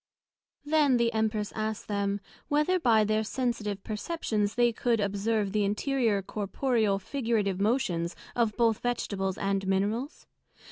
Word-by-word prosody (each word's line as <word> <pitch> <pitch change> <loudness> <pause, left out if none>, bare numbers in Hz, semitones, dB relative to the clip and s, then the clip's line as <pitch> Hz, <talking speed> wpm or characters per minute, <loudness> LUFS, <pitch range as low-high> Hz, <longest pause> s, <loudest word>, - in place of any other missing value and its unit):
Then 295 -4 +4
the 235 0 +1
Empress 220 -1 -1
asked 215 0 -3
them, 200 -1 -1 0.3
Whether 300 +6 +2
by 230 -7 +4
their 215 +1 +1
Sensitive 220 -4 -2
perceptions 215 -3 -2
they 240 -1 +3
could 230 0 +1
observe 205 +1 0
the 210 0 +1
interior 210 0 +1
corporeal, 215 +1 0
figurative 215 -4 -1
Motions 190 -7 0 0.2
both 230 -1 0 0.2
of - - -26
Vegetables 195 -6 -2
and 195 -1 -1
Minerals? 210 - -1
215 Hz, 130 wpm, -28 LUFS, 200-240 Hz, 0.3 s, Then